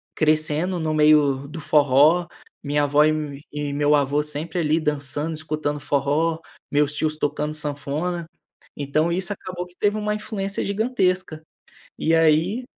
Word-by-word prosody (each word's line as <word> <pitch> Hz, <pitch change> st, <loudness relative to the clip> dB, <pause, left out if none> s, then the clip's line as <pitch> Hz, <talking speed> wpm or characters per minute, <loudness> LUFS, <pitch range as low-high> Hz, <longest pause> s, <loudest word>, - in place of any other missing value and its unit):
crescendo 155 Hz, +3 st, +1 dB
no 155 Hz, -1 st, -1 dB
meio 150 Hz, -3 st, +4 dB
do 160 Hz, +3 st, -8 dB
forró, 150 Hz, +4 st, +4 dB, 0.4 s
minha 145 Hz, 0 st, +1 dB
avó 145 Hz, +1 st, +4 dB
e 155 Hz, -, +3 dB
o 150 Hz, -2 st, -4 dB
e 140 Hz, -, -12 dB
e 145 Hz, -1 st, -3 dB
meu 145 Hz, +1 st, +3 dB
avô 145 Hz, +1 st, +1 dB
sempre, 155 Hz, +4 st, -4 dB
ali 155 Hz, 0 st, +2 dB
dançando 150 Hz, +1 st, -2 dB
escutando 155 Hz, -1 st, -3 dB
forró, 145 Hz, +4 st, 0 dB, 0.3 s
meus 145 Hz, 0 st, +2 dB
tios 155 Hz, 0 st, -1 dB
tocando 150 Hz, 0 st, -2 dB
sanfona, 150 Hz, +4 st, -3 dB, 0.5 s
então, 155 Hz, +4 st, 0 dB
isso 180 Hz, +2 st, -1 dB
acabou 180 Hz, -2 st, -7 dB
que 175 Hz, -, -21 dB
teve 205 Hz, +1 st, +1 dB
uma 210 Hz, 0 st, -1 dB
influência 205 Hz, -2 st, -4 dB
gigantesca. 190 Hz, -6 st, 0 dB, 0.6 s
E 165 Hz, +1 st, +2 dB
aí 165 Hz, +9 st, +3 dB
155 Hz, 150 wpm, -23 LUFS, 145-175 Hz, 0.6 s, meio